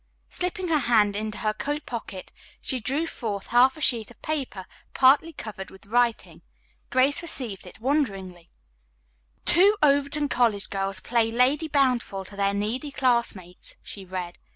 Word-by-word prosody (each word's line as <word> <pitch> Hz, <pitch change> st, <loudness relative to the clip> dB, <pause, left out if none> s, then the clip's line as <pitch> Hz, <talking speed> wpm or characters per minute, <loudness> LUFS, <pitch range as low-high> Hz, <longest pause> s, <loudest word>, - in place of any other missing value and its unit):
Slipping 360 Hz, 0 st, -3 dB
her 310 Hz, -2 st, +3 dB
hand 215 Hz, -6 st, +3 dB
into 215 Hz, 0 st, -3 dB
her 215 Hz, -1 st, 0 dB
coat 290 Hz, +6 st, -4 dB
pocket 220 Hz, -6 st, -7 dB, 0.3 s
she 260 Hz, -, -1 dB
drew 275 Hz, +9 st, 0 dB
forth 215 Hz, -10 st, -5 dB
a -, -, -11 dB
half 255 Hz, +5 st, +5 dB
sheet 230 Hz, -4 st, +2 dB
of 240 Hz, -, -16 dB
paper 270 Hz, -11 st, -3 dB, 0.3 s
partly 275 Hz, +5 st, +5 dB
covered 210 Hz, -9 st, -8 dB
with 190 Hz, -, -16 dB
writing. 235 Hz, +2 st, 0 dB, 0.5 s
Grace 265 Hz, +4 st, +3 dB
received 245 Hz, -, -2 dB
it 180 Hz, -, -12 dB
wonderingly: 195 Hz, -, -2 dB, 1.0 s
"Two 400 Hz, +4 st, +5 dB
Overton 285 Hz, +1 st, +3 dB
College 230 Hz, -7 st, +1 dB
Girls 195 Hz, -1 st, -1 dB
Play 230 Hz, 0 st, +1 dB
Lady 255 Hz, +7 st, +2 dB
Bountiful 250 Hz, -9 st, +1 dB
to 200 Hz, -, -10 dB
Their 200 Hz, 0 st, 0 dB
Needy 225 Hz, +8 st, -2 dB
Classmates," 235 Hz, -10 st, -1 dB
she 200 Hz, -, -8 dB
read. 180 Hz, -2 st, -6 dB
240 Hz, 150 wpm, -25 LUFS, 200-280 Hz, 1.0 s, half